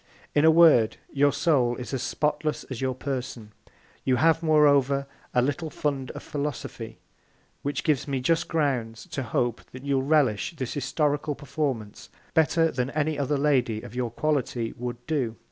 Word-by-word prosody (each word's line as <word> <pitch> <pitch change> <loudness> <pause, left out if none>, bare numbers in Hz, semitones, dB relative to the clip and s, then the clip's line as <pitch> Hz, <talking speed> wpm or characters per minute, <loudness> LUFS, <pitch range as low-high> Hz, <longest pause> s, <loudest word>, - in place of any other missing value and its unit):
In 145 +1 +4
a - - +8
Word, 160 -9 +6 0.2
your 145 0 +4
Soul 140 -5 +2
is 125 +2 -7
as 130 - -1
spotless 150 +2 -1
as 130 - -4
your 130 -1 -1
Person. 130 -5 -5 0.5
You 130 - +2
have, 160 +5 +3
moreover, 140 -3 +4 0.3
a 125 - +2
little 145 +4 -2
Fund 140 -4 -2
of - - -8
Philosophy, 140 -5 -5 0.6
which 145 +1 -2
gives 150 -3 +1
me 135 -2 -1
just 165 +6 +1
Grounds 130 -8 -1
to 140 - -2
hope 120 -1 -1
that 130 +1 -10
you'll 140 -1 +1
relish 140 -2 +1
this 130 -6 -4
Historical 145 +2 0
Performance 135 -7 -4 0.2
better 160 +1 +3
than 125 0 -1
any 150 0 -1
other 140 +1 0
Lady 125 -6 +1
of 120 - -10
your 125 -1 -2
Quality 125 -3 -1
would 120 0 -6
do. 135 -8 -1
140 Hz, 160 wpm, -26 LUFS, 125-150 Hz, 0.6 s, a